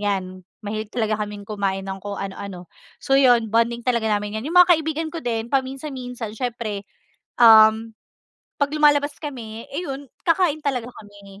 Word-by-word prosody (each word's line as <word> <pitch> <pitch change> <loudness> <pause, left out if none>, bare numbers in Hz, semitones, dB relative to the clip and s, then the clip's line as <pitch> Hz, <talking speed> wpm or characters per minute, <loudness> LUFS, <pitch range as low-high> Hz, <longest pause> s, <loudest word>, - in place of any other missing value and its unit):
'yan 190 -2 -2 0.2
mahilig 215 +1 -5
talaga 220 -3 0
kaming 205 -1 -9
kumain 195 -2 -2
ng 190 - -4
kung 205 -1 -5
ano-ano. 190 -2 -7 0.3
So, 270 - +2
'yon 245 -4 +4
bonding 230 +2 +1
talaga 235 -2 0
namin 205 +1 -2
yan. - - -9
'Yong 335 +4 -3
mga 355 0 +6
kaibigan 315 0 -3
ko 330 - -5
din 230 -1 -2
paminsan-minsan 260 -4 -3
siyempre, 230 -5 -4 0.5
um, 220 -1 +7 0.7
pag 285 - +2
lumalabas 290 -1 +3
kami, 230 -7 -7
eh, 300 - -2
'yon 275 -2 -6 0.2
kakain 330 -3 +2
talaga 250 -4 -1
kami 200 -2 -14
230 Hz, 160 wpm, -22 LUFS, 205-275 Hz, 0.7 s, um